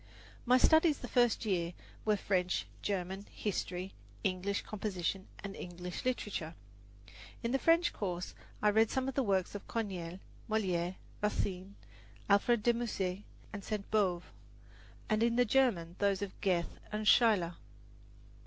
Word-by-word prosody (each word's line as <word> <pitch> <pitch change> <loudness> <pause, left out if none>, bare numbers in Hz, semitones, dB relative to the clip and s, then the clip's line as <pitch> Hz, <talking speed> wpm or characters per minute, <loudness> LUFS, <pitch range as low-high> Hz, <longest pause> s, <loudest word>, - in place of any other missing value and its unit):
My 250 +1 +7
studies 315 +3 +5
the 245 - -7
first 240 -2 +3
year 175 -4 0 0.3
were 210 -1 +3
French, 180 -3 0 0.2
German, 195 0 -3
history, 185 -2 -3 0.3
English 195 0 0
composition 195 -2 -3 0.2
and 200 -1 -5
English 180 0 -6
literature. 205 -10 -2 0.9
In 235 - 0
the 270 - +2
French 335 +3 +4
course 180 -3 -3 0.3
I 210 - +6
read 220 +1 +4
some 265 0 -1
of 270 - -2
the 275 - +2
works 195 -6 +1
of 205 - -7
Corneille, 185 -7 -3 0.3
Moliere, 185 -5 0 0.3
Racine, 200 -2 -2 0.5
Alfred 210 +2 +4
de 240 - +5
Musset 200 -6 -2 0.3
and 205 -1 -5
Sainte 210 -2 -4
Beuve, 185 -5 +2 0.8
and 215 0 +1
in 235 0 +3
the 245 0 +4
German 210 -9 +2
those 200 -1 +2
of 200 - -4
Goethe 175 -3 0
and 210 0 -2
Schiller. 210 -9 +5
200 Hz, 140 wpm, -33 LUFS, 180-230 Hz, 0.9 s, My